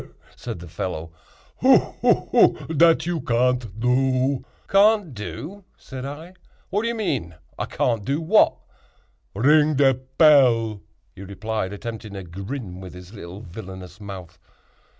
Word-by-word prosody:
"He! - - -13
he! - - -25
he!" - - -28
said - - -6
the 85 - -10
fellow, 80 -1 -5 0.5
"hu! - - +6
hu! - - +1 0.2
hu! 165 - +3
dat 165 +2 +4
you 170 -3 -2
can't 120 -3 0
do." 130 +2 +1 0.2
"Can't 205 -5 +4
do!" 155 - -7
said 130 -1 -8
I, 155 +6 -8 0.4
"what 205 - +1
do 230 - -2
you 235 - -1
mean?—I 120 - -4
can't 115 -4 -1
do 140 +8 -1
what?" 185 +7 +4 0.8
"Ring 150 +6 +4
de 135 -1 +5
pell," 130 -5 +3 0.3
he - - -12
replied, 100 +1 -4
attempting 110 0 -7
a 95 - -6
grin 95 +2 -7
with 95 -1 -10
his 90 +3 -12
little 95 -1 -9
villanous 95 -1 -10
mouth. 95 -4 -9
120 Hz, 150 wpm, -23 LUFS, 95-145 Hz, 0.8 s, hu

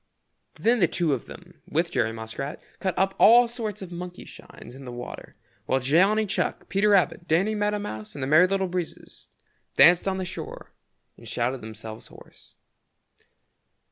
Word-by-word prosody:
Then 235 +2 +2
the 175 - +4
two 165 -4 0
of 130 - -4
them, - - -13
with - - 0
Jerry 115 - +1
Muskrat, 115 +6 -6 0.2
cut 190 -2 -2
up 195 0 +2
all 240 +2 +7
sorts 220 -4 -5
of 180 - -9
monkey 180 +1 -7
shines - - -13
in 135 +1 -11
the 125 - -8
water, 120 0 -9 0.3
while 130 - +2
Johnny 190 +11 +3
Chuck, 190 - -2
Peter 200 +2 +2
Rabbit, 185 -3 +2
Danny 185 +7 +2
Meadow 210 0 0
Mouse 110 - -7
and 140 - -4
the - - 0
Merry 155 +6 +6
Little 190 0 0
Breezes 180 -2 -6 0.5
danced 175 +2 +6
on 190 -1 0
the 190 - -3
shore 185 - -8 0.4
and 115 - -13
shouted 120 +3 -2
themselves 110 0 -8
hoarse. - - -17
180 Hz, 170 wpm, -25 LUFS, 130-200 Hz, 0.5 s, all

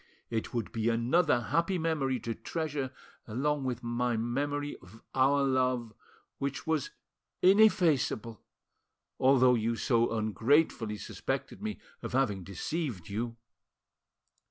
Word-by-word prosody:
It 110 -1 -2
would 115 -4 -3
be 115 0 0
another 120 +5 +3
happy 170 - 0
memory 150 -6 0
to 115 - -3
treasure 150 -1 -3 0.4
along 140 +5 -1
with 125 -1 -3
my 120 0 0
memory 145 +5 -2
of 95 +4 -16
our 140 +2 +3
love, 130 -4 +1 0.5
which 140 +3 -3
was 160 -4 0 0.5
ineffaceable, 180 - +4 0.8
although 130 -1 +5
you 115 0 +1
so 115 0 +2
ungratefully 110 - +1
suspected 135 - -4
me 215 0 -3 0.2
of - - -6
having 105 -8 +1
deceived 100 - -4
you." 115 +3 -3
130 Hz, 115 wpm, -30 LUFS, 115-145 Hz, 0.8 s, although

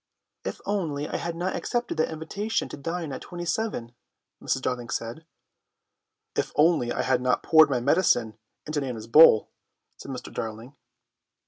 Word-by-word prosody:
"If - - -5
only 155 -8 -2
I - - -3
had 170 -1 -4
not 180 +3 -2
accepted 240 -8 -2
that 160 - +1
invitation 200 +8 -2
to - - -6
dine 165 +2 -4
at 130 - -6
27," 175 - -3 0.5
Mrs. 130 - -1
Darling 125 -2 -2
said. 120 +8 -5 1.1
"If - - -1
only 150 -5 +3
I - - -1
had 125 - +1
not 125 0 +1
poured 160 -2 +6
my 130 -3 +1
medicine 120 - +2 0.3
into 150 -1 -2
Nana's 120 -5 -5
bowl," 115 -2 +7 0.5
said - - -10
Mr. 130 -2 -7
Darling. 115 +5 -6
150 Hz, 150 wpm, -26 LUFS, 125-170 Hz, 1.1 s, bowl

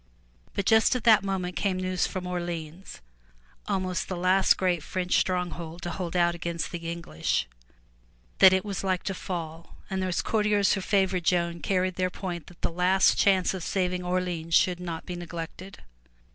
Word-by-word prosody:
But 200 - -1
just 220 +4 +4
at 250 - -2
that 220 -4 +6
moment 185 -2 -2
came 195 -2 0
news 185 -1 0
from 185 -2 -5
Orleans, 175 - -5 0.7
almost 185 -2 -1
the 185 - -4
last 185 +2 +4
great 180 -3 +1
French 180 +3 -1
stronghold 175 -2 -3
to 175 - -3
hold 175 -1 -4
out 175 -1 +3
against 170 -1 -4
the 170 -2 -5
English, 170 - -2 0.9
that 190 - +9
it 190 +2 +1
was 200 -2 -4
like 185 -2 0
to 195 - -2
fall, 170 -3 -6
and 190 0 -1
those 185 -2 -1
courtiers 210 -2 +2
who 195 - -1
favored 190 -3 +1
Joan 170 -1 +1
carried 185 0 0
their 185 0 +1
point 175 -3 -6
that 175 - -16
the - - 0
last 180 +3 +3
chance 190 -2 +3
of 190 - -5
saving 180 0 -1
Orleans 180 -2 -1
should 180 -1 +3
not 170 -2 -5
be 180 - -5
neglected. 175 +2 -8
180 Hz, 175 wpm, -27 LUFS, 170-190 Hz, 0.9 s, that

